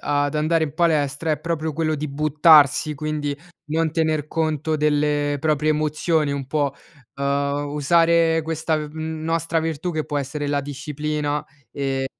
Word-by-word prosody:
ad 145 0 0
andare 160 +1 +2
in 145 - -7
palestra 155 -2 +1
è 150 - +1
proprio 160 0 -2
quello 155 0 0
di 150 0 -4
buttarsi, 150 0 +4
quindi 150 -1 -3 0.3
non 160 0 0
tener 155 -2 0
conto 155 -1 -1
delle 150 -1 +1
proprie 155 0 +1
emozioni 155 0 +1
un 140 -1 -3
po', 145 -3 0 0.4
uhm, 140 +1 -1
usare 165 +2 +3
questa 160 0 -1
v 150 -1 -5
nostra 160 +1 -2
virtù 165 +2 -3
che 155 -1 -2
può 145 - -2
essere 145 +1 -3
la 145 0 +1
disciplina, 150 +1 -3 0.3
ehm, 135 -1 -2
150 Hz, 150 wpm, -22 LUFS, 145-160 Hz, 0.4 s, buttarsi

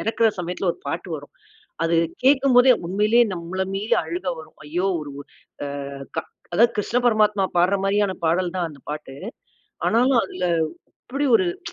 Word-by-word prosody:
இறக்குற 225 0 +2
சமயத்துல 180 +1 -2
ஒரு - - -18
பாட்டு 170 +6 -4
வரும். 145 -1 -13 0.5
அது 165 - +1 0.3
கேட்கும்போதே 265 -2 +6
உண்மையிலேயே 210 +6 +3
நம்மள 175 +2 -3
மீறி 205 +3 +1
அழுக 175 +3 -5
வரும். 160 - -12
ஐயோ! 175 +6 -1
ஒரு 150 -1 -7
உ - - -6 0.7
அ - - -9 0.3
க - - +4 0.3
அதாவது 235 +5 +5
கிருஷ்ண 210 +3 0
பரமாத்மா 210 -3 +3
பாடுற 180 +3 +4
மாரியான 200 0 +2
பாடல் 175 +2 +1
தான் 175 -2 0
அந்த 145 -3 -13
பாட்டு. 150 -2 -6 0.7
ஆனாலும் 245 +3 +4
அதில 185 -1 -5 0.6
அப்படி 275 +3 -2
ஒரு - - +1 0.2
ச்சு - - -10
195 Hz, 160 wpm, -23 LUFS, 170-230 Hz, 0.7 s, கேட்கும்போதே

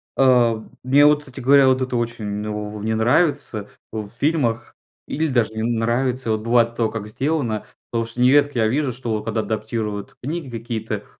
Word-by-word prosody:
А 120 -4 +4 0.2
мне 140 +3 +5
вот 150 0 +5
кстати 135 -2 -10
говоря, 135 +1 +5
вот 130 0 +3
это 130 -1 -2
очень 110 -3 -3
в 105 0 -5
не 110 +1 0
нравится 120 - +1 0.2
в 110 -2 -4
фильмах 140 -7 0 0.3
или 160 +2 -1
даже 120 -6 +1
не 110 - -3
нравится 120 +1 0
Вот 110 0 0
бывает 115 0 +2
то 115 -2 +1
как 110 -2 -5
сделано. 125 -2 -1 0.3
Потому 115 -1 0
что 115 +2 -6
нередко 140 +1 +4
я 110 - +3
вижу, 135 +2 0
что 115 -4 -3
когда 115 0 -2
адаптируют 110 -1 -4
книги 150 +1 -4
какие-то, 110 -2 -4
115 Hz, 170 wpm, -21 LUFS, 110-130 Hz, 0.3 s, мне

